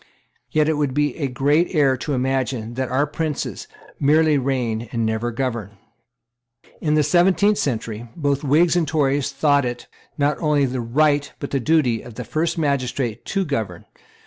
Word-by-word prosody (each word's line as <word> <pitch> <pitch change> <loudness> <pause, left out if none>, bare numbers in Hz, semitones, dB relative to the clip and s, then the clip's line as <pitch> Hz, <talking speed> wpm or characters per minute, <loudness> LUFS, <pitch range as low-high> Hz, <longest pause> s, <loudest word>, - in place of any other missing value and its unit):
Yet 155 -1 +2
it 160 -1 +1
would 145 -3 -1
be 145 -2 +1
a 140 - -1
great 145 +8 +1
error 140 -3 +4
to 145 +3 -3
imagine 130 -3 -1
that 130 +1 -2
our 130 +3 +2
princes 150 0 -4 0.3
merely 155 +2 +4
reign 125 -4 -1
and 115 -1 -1
never 110 +2 -1
govern. 115 -5 -4 1.0
In 150 -1 +1
the 155 - +4
seventeenth 190 +5 +3
century, 115 -3 -3
both 145 -3 -1
Whigs 155 +5 +3
and 170 -3 +1
Tories 145 -2 +1
thought 145 0 +2
it, 120 -1 -4 0.3
not 145 0 +1
only 150 -3 +2
the 130 -1 -2
right, 145 +4 +1
but 140 - -6
the 140 - +1
duty, 125 -4 +2
of 120 -2 -12
the 125 - -5
first 165 +5 -1
magistrate 130 -6 -1
to 195 -1 -1
govern. 110 - -3
140 Hz, 170 wpm, -21 LUFS, 120-150 Hz, 1.0 s, error